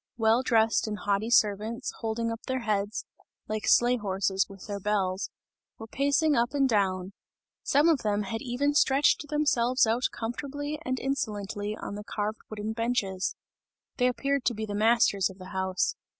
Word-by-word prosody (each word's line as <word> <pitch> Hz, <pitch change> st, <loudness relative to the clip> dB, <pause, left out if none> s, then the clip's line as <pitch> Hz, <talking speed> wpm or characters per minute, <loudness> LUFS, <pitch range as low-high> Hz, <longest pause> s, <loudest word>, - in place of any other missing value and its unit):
Well 225 Hz, +1 st, +3 dB
dressed 225 Hz, -3 st, +2 dB
and 210 Hz, -1 st, -3 dB
haughty 205 Hz, +2 st, -1 dB
servants, 220 Hz, +2 st, +2 dB
holding 230 Hz, 0 st, -2 dB
up 230 Hz, -, -5 dB
their 260 Hz, -1 st, -1 dB
heads, 210 Hz, -1 st, -1 dB, 0.4 s
(like 215 Hz, 0 st, -3 dB
sleigh 245 Hz, +1 st, +5 dB
horses 195 Hz, -2 st, 0 dB
with 195 Hz, -1 st, -11 dB
their 200 Hz, -1 st, -4 dB
bells,) 195 Hz, -1 st, -1 dB, 0.5 s
were 225 Hz, -, -8 dB
pacing 285 Hz, +5 st, +2 dB
up 240 Hz, +3 st, +1 dB
and 275 Hz, -1 st, +3 dB
down; 195 Hz, -4 st, 0 dB, 0.5 s
some 290 Hz, +4 st, +3 dB
of 320 Hz, -4 st, +4 dB
them 210 Hz, -2 st, 0 dB
had 225 Hz, +3 st, -4 dB
even 265 Hz, +4 st, 0 dB
stretched 285 Hz, +1 st, +3 dB
themselves 275 Hz, -5 st, +2 dB
out 230 Hz, +3 st, +1 dB
comfortably 290 Hz, +6 st, -5 dB
and 255 Hz, -2 st, -2 dB
insolently 210 Hz, -5 st, -3 dB
on -, -, -6 dB
the 210 Hz, +1 st, -6 dB
carved 210 Hz, +1 st, -3 dB
wooden 215 Hz, 0 st, -4 dB
benches; 215 Hz, -5 st, -1 dB, 0.6 s
they 250 Hz, -, +3 dB
appeared 275 Hz, +2 st, 0 dB
to 240 Hz, -, +1 dB
be 220 Hz, +1 st, -3 dB
the 205 Hz, -, -5 dB
masters 215 Hz, -2 st, +3 dB
of 190 Hz, -, -12 dB
the 185 Hz, -1 st, -10 dB
house. 190 Hz, -1 st, -1 dB
225 Hz, 165 wpm, -28 LUFS, 205-255 Hz, 0.6 s, sleigh